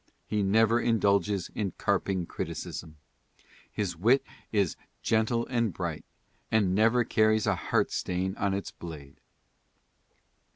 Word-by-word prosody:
He 105 Hz, -, -1 dB
never 110 Hz, +4 st, +4 dB
indulges 100 Hz, -4 st, +1 dB
in 100 Hz, -4 st, -2 dB
carping 95 Hz, -2 st, 0 dB
criticism. 80 Hz, -1 st, -6 dB, 0.7 s
His 95 Hz, -4 st, -2 dB
wit 115 Hz, +11 st, +3 dB, 0.3 s
is 100 Hz, -6 st, +1 dB, 0.3 s
'■'gentle 115 Hz, +1 st, +1 dB
and 115 Hz, -4 st, 0 dB
bright" 85 Hz, -2 st, -4 dB, 0.5 s
and 105 Hz, -4 st, +2 dB
"never 115 Hz, +4 st, +4 dB
carries 110 Hz, -1 st, +3 dB
a -, -, +3 dB
heartstain 95 Hz, +1 st, -1 dB
on 100 Hz, -3 st, 0 dB
its 100 Hz, -, -4 dB
blade." 75 Hz, -5 st, -10 dB
100 Hz, 115 wpm, -29 LUFS, 90-110 Hz, 0.7 s, never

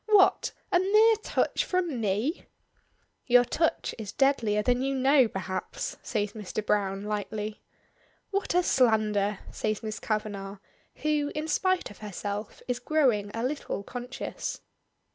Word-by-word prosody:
What! 410 Hz, -3 st, +5 dB, 0.2 s
A 355 Hz, -, +5 dB
mere 430 Hz, +4 st, +5 dB
touch 435 Hz, -, 0 dB
from 345 Hz, -9 st, -1 dB
me!" 215 Hz, -, -1 dB, 0.8 s
"Your 245 Hz, 0 st, +6 dB
touch 325 Hz, +6 st, 0 dB
is 210 Hz, -3 st, -5 dB
deadlier 235 Hz, -7 st, +2 dB
than 245 Hz, +2 st, +2 dB
you 270 Hz, +1 st, 0 dB
know, 265 Hz, -1 st, +5 dB
perhaps," 190 Hz, -2 st, -4 dB
says 210 Hz, -3 st, -2 dB
Mr. 215 Hz, 0 st, -5 dB
Browne, 195 Hz, -1 st, 0 dB
lightly. 210 Hz, 0 st, -3 dB, 0.7 s
"What 395 Hz, -3 st, -1 dB
a 360 Hz, -, +4 dB
slander!" 215 Hz, -, +2 dB
says 215 Hz, 0 st, -2 dB
Miss 215 Hz, -1 st, -4 dB
Kavanagh, 205 Hz, -2 st, -3 dB, 0.5 s
who, 300 Hz, -1 st, +1 dB
in 305 Hz, +1 st, -2 dB
spite 370 Hz, -, +1 dB
of -, -, -14 dB
herself, 205 Hz, 0 st, -5 dB
is 250 Hz, -1 st, -1 dB
growing 250 Hz, -10 st, +2 dB
a 230 Hz, -, -2 dB
little 260 Hz, -6 st, -3 dB
conscious. 245 Hz, +4 st, -5 dB
230 Hz, 135 wpm, -28 LUFS, 210-300 Hz, 0.8 s, Your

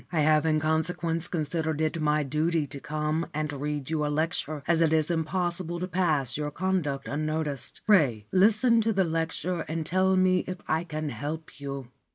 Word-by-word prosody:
I 160 Hz, -3 st, +1 dB
have 155 Hz, +1 st, +4 dB
in 155 Hz, -1 st, +3 dB
consequence 160 Hz, +2 st, -1 dB
considered 160 Hz, -1 st, -2 dB
it 160 Hz, +1 st, 0 dB
my 150 Hz, 0 st, +2 dB
duty 155 Hz, +3 st, 0 dB
to 140 Hz, 0 st, -7 dB
come 155 Hz, +3 st, -2 dB
and 150 Hz, -1 st, -2 dB
read 145 Hz, 0 st, -3 dB
you 155 Hz, -2 st, 0 dB
a -, -, +1 dB
lecture, 155 Hz, -1 st, -1 dB
as 170 Hz, -1 st, +3 dB
it 160 Hz, -2 st, +4 dB
is 160 Hz, +1 st, +2 dB
impossible 175 Hz, +1 st, -1 dB
to 180 Hz, -, -2 dB
pass 160 Hz, -9 st, +1 dB
your 150 Hz, -1 st, -2 dB
conduct 155 Hz, -5 st, -1 dB
unnoticed. 155 Hz, -2 st, -3 dB
Pray 140 Hz, -, +4 dB
listen 220 Hz, +4 st, +4 dB
to 225 Hz, 0 st, +1 dB
the 195 Hz, -1 st, +3 dB
lecture 165 Hz, +1 st, -1 dB
and 160 Hz, 0 st, -3 dB
tell 185 Hz, +2 st, +2 dB
me 185 Hz, 0 st, +4 dB
if 185 Hz, 0 st, -4 dB
I 160 Hz, +2 st, 0 dB
can 155 Hz, -2 st, -3 dB
help 145 Hz, +6 st, -6 dB
you.' 140 Hz, -3 st, -6 dB
160 Hz, 185 wpm, -27 LUFS, 150-175 Hz, -, have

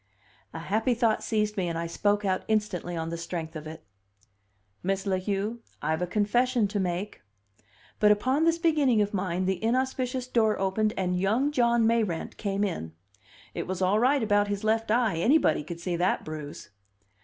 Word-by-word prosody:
A -, -, -7 dB
happy 220 Hz, +9 st, 0 dB
thought 230 Hz, -2 st, +1 dB
seized 210 Hz, -1 st, -1 dB
me, 185 Hz, -2 st, 0 dB
and 165 Hz, -1 st, -2 dB
I 165 Hz, -, -2 dB
spoke 205 Hz, +4 st, 0 dB
out 185 Hz, -1 st, +1 dB
instantly 210 Hz, -5 st, -1 dB
on 165 Hz, 0 st, -3 dB
the 170 Hz, -, -4 dB
strength 165 Hz, -1 st, -5 dB
of 155 Hz, 0 st, -6 dB
it. 160 Hz, 0 st, -9 dB, 1.0 s
"Miss 195 Hz, +1 st, -1 dB
La 190 Hz, -2 st, +1 dB
Heu, 205 Hz, +4 st, -2 dB, 0.2 s
I've 160 Hz, +2 st, -1 dB
a 180 Hz, -, 0 dB
confession 225 Hz, +4 st, +1 dB
to 205 Hz, -, -2 dB
make." 185 Hz, +2 st, -3 dB, 0.8 s
But 210 Hz, 0 st, +6 dB
upon 260 Hz, +8 st, +2 dB
this 330 Hz, 0 st, +3 dB
beginning 295 Hz, -10 st, +3 dB
of 205 Hz, -, -4 dB
mine 185 Hz, -2 st, -1 dB
the 190 Hz, +1 st, -1 dB
inauspicious 255 Hz, +1 st, 0 dB
door 225 Hz, -4 st, +2 dB
opened 210 Hz, +3 st, 0 dB
and 180 Hz, -1 st, 0 dB
young 225 Hz, +10 st, +1 dB
John 235 Hz, -4 st, +3 dB
Mayrant 220 Hz, -7 st, 0 dB
came 200 Hz, -1 st, -1 dB
in. 165 Hz, -, -3 dB, 0.6 s
It -, -, -4 dB
was 185 Hz, 0 st, -3 dB
all 190 Hz, +3 st, +2 dB
right 260 Hz, +2 st, +3 dB
about 205 Hz, -1 st, +2 dB
his 205 Hz, 0 st, -3 dB
left 225 Hz, +1 st, +1 dB
eye; 225 Hz, -5 st, +2 dB
anybody 240 Hz, -, +3 dB
could 170 Hz, +3 st, -7 dB
see 175 Hz, 0 st, -2 dB
that 180 Hz, +2 st, 0 dB
bruise! 150 Hz, -7 st, -8 dB
205 Hz, 180 wpm, -27 LUFS, 180-230 Hz, 1.0 s, But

